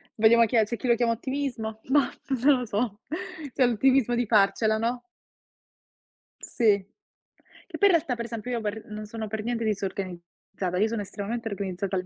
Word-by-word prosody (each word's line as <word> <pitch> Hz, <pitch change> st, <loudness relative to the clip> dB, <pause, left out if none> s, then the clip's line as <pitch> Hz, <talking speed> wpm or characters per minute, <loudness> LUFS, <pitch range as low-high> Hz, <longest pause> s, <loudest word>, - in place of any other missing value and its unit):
Vediamo 230 Hz, +1 st, +6 dB
chi 230 Hz, -, -2 dB
è 220 Hz, -2 st, +5 dB
c'è 235 Hz, +2 st, -4 dB
chi 255 Hz, -, -4 dB
lo 235 Hz, -, +5 dB
chiama 235 Hz, -1 st, +1 dB
ottimismo, 240 Hz, -3 st, -3 dB
mah, 285 Hz, 0 st, +3 dB, 0.3 s
non 280 Hz, -3 st, +5 dB
lo 245 Hz, -, -3 dB
so. 210 Hz, -1 st, -2 dB, 0.5 s
C'è 255 Hz, -, +3 dB
l'ottimismo 245 Hz, +1 st, +3 dB
di 245 Hz, -, +1 dB
farcela, 215 Hz, +1 st, +3 dB
no? 235 Hz, +2 st, -1 dB, 1.4 s
Sì. 240 Hz, -, -5 dB, 1.0 s
Che -, -, -7 dB
poi 405 Hz, -1 st, +5 dB
in 350 Hz, -, +5 dB
realtà, 300 Hz, -6 st, 0 dB
per 235 Hz, -, -4 dB
esempio, 230 Hz, +1 st, -5 dB
io 235 Hz, -2 st, -1 dB
per 215 Hz, +1 st, -4 dB
non 215 Hz, 0 st, -6 dB
sono 220 Hz, 0 st, -6 dB
per 215 Hz, 0 st, -4 dB
niente 235 Hz, -1 st, -2 dB
disorganizzata, 185 Hz, -2 st, -4 dB
io 215 Hz, +3 st, +3 dB
sono 225 Hz, -2 st, -2 dB
estremamente 225 Hz, +3 st, -4 dB
organizzata 195 Hz, -1 st, -3 dB
al 185 Hz, 0 st, -1 dB
225 Hz, 180 wpm, -26 LUFS, 205-245 Hz, 1.4 s, Vediamo